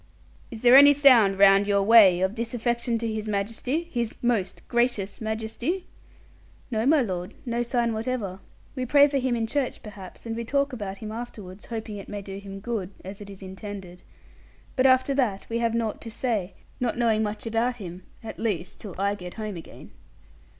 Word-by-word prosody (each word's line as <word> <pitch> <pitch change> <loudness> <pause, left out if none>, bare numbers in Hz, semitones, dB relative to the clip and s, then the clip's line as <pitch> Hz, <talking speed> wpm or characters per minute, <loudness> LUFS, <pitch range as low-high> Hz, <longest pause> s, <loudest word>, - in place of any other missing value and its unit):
'Is 230 -1 -9
there 245 +1 +8
any 285 +1 +9
sound 245 -9 +6
round 195 0 +6
your 200 -1 +3
way 200 -5 +7
of 190 +1 +1
disaffection 235 +1 -1
to 230 0 -3
His 220 -1 -3
Majesty, 225 +9 -2
His 235 -3 -1
most 230 -6 -1
gracious 235 -5 0
Majesty?' 225 +11 -3 0.9
'No, 225 +1 0
my 300 0 +5
lord: 180 -4 -4
no 240 -1 -1
sign 235 -1 0
whatever. 220 -4 -3 0.4
We 255 - -2
pray 285 +3 +6
for 280 -1 0
him 255 -1 0
in 230 -1 0
church 265 +3 -2
perhaps, 205 -2 -11
and 225 -1 -3
we 235 - -3
talk 280 +3 0
about 200 -5 -5
him 215 +1 -7
afterwards, 210 -5 -8
hoping 220 -2 -5
it 200 - -9
may 205 -1 -5
do 195 0 -7
him 195 -1 -9
good, 215 -5 -3 0.2
as 195 +2 -8
it 200 - -9
is 195 0 -11
intended. 190 -1 -8 0.7
But 260 0 +4
after 260 +1 +4
that 235 -8 0
we 230 0 -1
have 230 -1 0
naught 225 -2 -2
to 230 - -7
say, 220 -5 -2 0.2
not 245 -2 -1
knowing 225 -3 +2
much 210 +1 -3
about 230 +2 0
him 185 -5 -8 0.2
at 225 - -8
least 195 -6 -3
till 200 -5 -8
I 200 +1 +1
get 180 -3 -8
home 215 -3 -5
again.' 165 - -11
220 Hz, 190 wpm, -26 LUFS, 200-240 Hz, 0.9 s, any